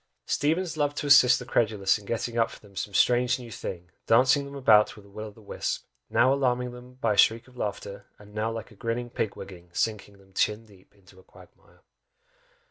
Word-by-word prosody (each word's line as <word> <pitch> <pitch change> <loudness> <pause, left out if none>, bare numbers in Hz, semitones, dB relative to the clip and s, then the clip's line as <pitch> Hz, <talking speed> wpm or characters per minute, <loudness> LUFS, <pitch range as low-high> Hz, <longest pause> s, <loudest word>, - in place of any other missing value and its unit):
Steevens 165 +3 0
loved 145 -1 0
to - - -3
assist 130 -4 +7
the 125 - -8
credulous 105 -4 +1
in 100 - -16
getting 115 0 -3
up 115 -1 +2
for - - -12
them 100 -2 -19
some 105 +1 -4
strange 125 +4 +3
new 120 -2 -10
thing, 90 -4 -7 0.2
dancing 130 +5 +4
them 140 0 -9
about 110 -6 +4
with 105 -2 -15
a - - -18
Will 110 +2 -7
o' - - -10
the 110 +1 -18
wisp - - -4 0.2
now 130 +2 +4
alarming 125 -2 0
them 125 +1 -13
by 115 -4 0
a - - -5
shriek 115 +2 +4
of 130 - -19
laughter! 100 -3 -5
and 105 0 -16
now 110 +1 -1
like 115 +1 -7
a - - -16
grinning 115 +3 -3
Pigwigging 95 -6 -5
sinking 105 -2 -2
them 95 -1 -23
chin 105 +3 0
deep 100 -2 -21
into 95 -1 -20
a - - -18
quagmire! - - -20
115 Hz, 215 wpm, -27 LUFS, 100-125 Hz, 0.2 s, assist